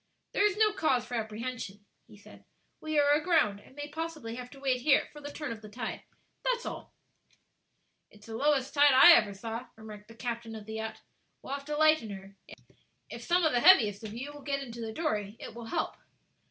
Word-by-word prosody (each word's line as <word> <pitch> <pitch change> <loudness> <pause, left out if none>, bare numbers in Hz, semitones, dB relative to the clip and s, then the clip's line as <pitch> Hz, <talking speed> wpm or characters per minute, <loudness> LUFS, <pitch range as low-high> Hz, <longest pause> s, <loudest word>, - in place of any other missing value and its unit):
"There - - +1
is 415 -1 +2
no 430 -1 +4
cause 265 - +1
for 245 - -10
apprehension," 220 -2 -5 0.2
he 210 - -16
said; 205 - -16 0.4
"we 310 -1 -3
are 290 0 +4
aground, 300 - +2
and 260 - -19
may 290 0 -6
possibly 310 -6 -5
have 250 +1 -7
to 275 - -14
wait 260 -2 0
here 280 +1 +3
for 295 - -11
the 290 0 -7
turn 295 -2 -5
of 225 -1 -7
the 215 - -11
tide; 225 +1 -5 0.4
that's - - 0
all." - - -7 1.2
"It's 210 0 -18
the 225 - -7
lowest 275 +1 +1
tide 290 -1 +6
I 265 +7 +10
ever 215 -9 +3
saw," 230 +4 -6
remarked 215 -1 -11
the 230 - -14
captain 230 -1 -5
of 215 -1 -9
the 220 - -7
yacht; 220 0 -5 0.4
"we'll 270 - -5
have 280 0 -5
to 300 0 -3
lighten 310 -7 +4
her; 195 0 -9 0.8
if - - -7
some 355 +1 +2
of 315 - +3
the 245 - +2
heaviest 225 - +6
of 215 0 -7
you 270 +5 -6
will 290 - -11
get 275 -1 -2
into 235 -2 -8
the 225 -1 -4
dory, 215 -7 -2
it - - -8
will 235 0 -9
help." 225 - -2
250 Hz, 215 wpm, -30 LUFS, 220-295 Hz, 1.2 s, I